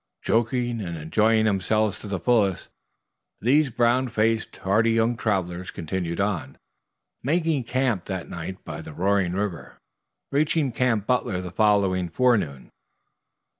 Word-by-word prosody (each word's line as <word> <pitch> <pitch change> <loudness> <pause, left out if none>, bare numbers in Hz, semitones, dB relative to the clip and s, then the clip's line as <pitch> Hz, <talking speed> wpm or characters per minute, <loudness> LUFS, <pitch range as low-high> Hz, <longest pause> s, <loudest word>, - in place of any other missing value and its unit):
Joking 120 0 0
and 85 -4 -5
enjoying 110 +8 +2
themselves 110 +1 +1
to - - -9
the 95 -2 -3
fullest, 100 -2 +1 0.7
these 140 +5 +3
brown 120 +2 +2
faced, 110 -1 0
hardy 105 +4 +2
young 115 +1 +2
travelers 95 -5 -2
continued 85 +1 -4
on, 100 -4 -2 0.6
making 160 -2 0
camp 120 -7 0
that 95 -3 -4
night 90 +2 -7
by - - -6
the 80 - -10
roaring 95 +1 +1
river, 100 -3 -4 0.5
reaching 145 -1 +1
Camp 115 -3 +1
Butler 120 -7 0
the 90 -1 -6
following 100 -4 +2
forenoon. 100 - +1
105 Hz, 130 wpm, -25 LUFS, 95-120 Hz, 0.7 s, these